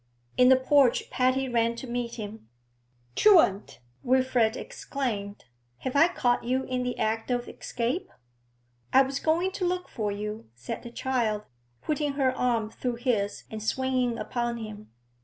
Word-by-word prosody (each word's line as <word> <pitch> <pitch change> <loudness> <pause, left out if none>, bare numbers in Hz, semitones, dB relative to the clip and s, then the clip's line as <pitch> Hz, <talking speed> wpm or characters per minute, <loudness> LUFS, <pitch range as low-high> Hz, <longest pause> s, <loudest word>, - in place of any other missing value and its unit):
In 250 0 +6
the 260 - +8
porch 260 -1 +3
Patty 255 +1 +2
ran 235 -1 +1
to 235 - -7
meet 240 -1 -3
him. 210 - -8 0.7
'Truant!' 325 - +4 0.2
Wilfrid 255 -3 +2
exclaimed. 230 - -4 0.4
'Have 260 - -3
I 320 +4 +7
caught 245 -9 +1
you 255 +2 0
in 255 -1 -2
the 250 0 -2
act 225 +2 -1
of 245 -1 -1
escape?' 250 +11 -3 0.8
'I 265 - +8
was 270 +1 -3
going 340 +4 +1
to 370 -1 -1
look 360 0 -2
for 210 -2 -2
you,' 210 - -5
said 120 +1 -6
the 235 - -8
child, 235 -4 -1 0.4
putting 295 -1 -1
her 265 -2 +1
arm 230 -4 0
through 245 0 -3
his 235 -5 -1
and 220 -1 -5
swinging 255 +1 0
upon 240 +2 -2
him. 215 -2 -8
245 Hz, 155 wpm, -27 LUFS, 225-265 Hz, 0.8 s, the